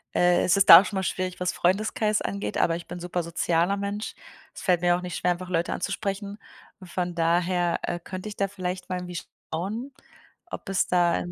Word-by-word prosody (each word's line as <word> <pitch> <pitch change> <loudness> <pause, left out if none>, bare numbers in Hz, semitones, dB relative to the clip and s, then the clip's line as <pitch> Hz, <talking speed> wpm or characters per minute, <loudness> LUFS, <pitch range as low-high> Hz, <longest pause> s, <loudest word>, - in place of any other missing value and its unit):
äh, 175 0 +4
ist 180 +2 +3
es 200 - +5
da 165 +2 +12
auch - - -6
schon 200 - -4
mal - - +1
schwierig, 185 0 -3
was 180 0 0
Freundeskreis 210 +3 +1
angeht, 200 0 -3
aber 165 - +2
ich 170 - -7
bin 175 +1 -7
super 175 0 -3
sozialer 170 +3 0
Mensch. 200 +1 -4 0.4
Es - - -10
fällt 180 -3 +2
mir 175 0 +4
auch - - -6
nicht 180 -1 -5
schwer, 180 - +1
einfach 180 +1 -4
Leute 170 -1 0
anzusprechen. 200 +1 -3 0.5
Von 175 -1 -3
daher, 175 +1 +1
äh, 175 0 -2
könnte 185 +4 -7
ich 205 - -8
da 195 - 0
vielleicht 185 -2 -5
mal 185 - -1
irgendwie 180 -1 -5 0.3
schauen, 215 - -3 0.6
ob - - -7
es 195 0 +1
da 175 -1 +3
in 175 - -5
180 Hz, 210 wpm, -26 LUFS, 175-195 Hz, 0.6 s, da